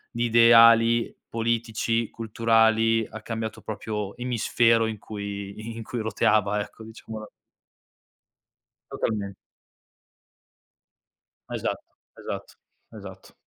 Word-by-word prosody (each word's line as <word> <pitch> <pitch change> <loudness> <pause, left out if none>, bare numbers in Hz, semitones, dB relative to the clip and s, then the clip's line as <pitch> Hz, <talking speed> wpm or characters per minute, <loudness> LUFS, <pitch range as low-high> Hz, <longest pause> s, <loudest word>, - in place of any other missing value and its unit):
di 120 +1 0
ideali, 115 0 +6
politici, 115 0 -1
culturali, 115 0 +2
ha 110 - -9
cambiato 110 -1 -5
proprio 105 -1 -5
emisfero 115 -1 +2
in 110 -2 -4
cui 100 +1 -7
in 115 - -6
cui 120 +2 -5
roteava 105 -1 +1
ecco, 110 +2 -10
diciamola 110 -1 -9 1.6
Totalmen 100 -3 -3 2.1
Esatto. - - -3 0.3
Esatto. - - -7 0.4
Esatto. - - -12
115 Hz, 85 wpm, -25 LUFS, 110-115 Hz, 2.1 s, ideali